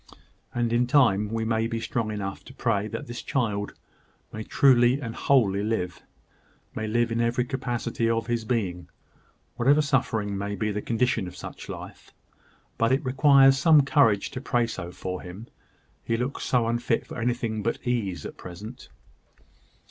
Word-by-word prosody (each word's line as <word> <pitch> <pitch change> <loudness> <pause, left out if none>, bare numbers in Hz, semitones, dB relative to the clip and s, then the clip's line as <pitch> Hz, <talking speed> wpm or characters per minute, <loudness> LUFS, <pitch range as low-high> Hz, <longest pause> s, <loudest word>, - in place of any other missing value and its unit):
"And 120 -1 -1
in 120 +1 +2
time 120 -7 +4
we 115 0 -1
may 110 0 +1
be 115 0 -3
strong 115 -1 -2
enough 100 -2 -5
to 130 - -13
pray 105 -5 0
that - - -6
this 120 0 -7
child 105 -7 -2 0.6
may 110 - -5
truly 125 +2 +4
and 115 -5 -5
wholly 110 -9 +2
live 100 -5 -2 0.7
may 110 - -3
live 120 +1 +1
in 115 +1 0
every 120 +1 +1
capacity 120 -3 -2
of 115 0 0
his 120 -1 -1
being, 95 -7 -2 0.7
whatever 135 +4 +4
suffering 115 -8 0
may 100 +1 -3
be 105 0 -1
the 105 0 -3
condition 115 -3 0
of 90 - -9
such - - -9
life: - - -9 0.6
but 115 +2 +3
it 135 +2 +1
requires 135 0 +5
some 155 -3 +6
courage 115 -9 +3
to 125 - -6
pray 120 -3 +1
so 90 -6 -6
for 90 0 -5
him, 90 +5 -9 0.6
he 115 - -1
looks 125 +4 -3
so 125 -3 +2
unfit 120 0 0
for - - -8
anything 115 -2 -1
but 115 +3 -1
ease 115 -7 -2
at - - -8
present!" 105 +7 -10
115 Hz, 165 wpm, -26 LUFS, 105-125 Hz, 0.7 s, some